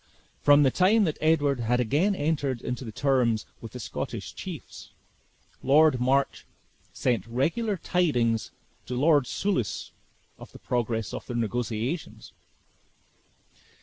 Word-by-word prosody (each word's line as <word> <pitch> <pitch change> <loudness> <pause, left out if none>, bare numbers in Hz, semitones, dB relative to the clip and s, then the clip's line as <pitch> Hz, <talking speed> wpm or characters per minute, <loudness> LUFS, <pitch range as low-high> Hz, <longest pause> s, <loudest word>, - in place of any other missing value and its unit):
From 145 0 +6
the 135 - +4
time 205 - +4
that 155 -6 -1
Edward 145 -4 +2
had 120 +1 +1
again 150 - +2
entered 145 -5 -1
into 125 -2 -4
terms 120 -4 +1 0.2
with 115 -2 -9
the 125 - -7
Scottish 110 - -5
chiefs, - - -9 0.7
Lord 145 0 +4
March 135 +2 +1 0.4
sent 125 -4 -1
regular 170 - 0
tidings 125 -12 +1 0.4
to 125 - -3
Lord 145 -3 +4
Soulis 185 - -2 0.5
of - - -12
the - - -10
progress 115 -3 -2
of - - -6
their 120 - -3
negotiations. 120 - -3
135 Hz, 120 wpm, -27 LUFS, 120-155 Hz, 0.7 s, From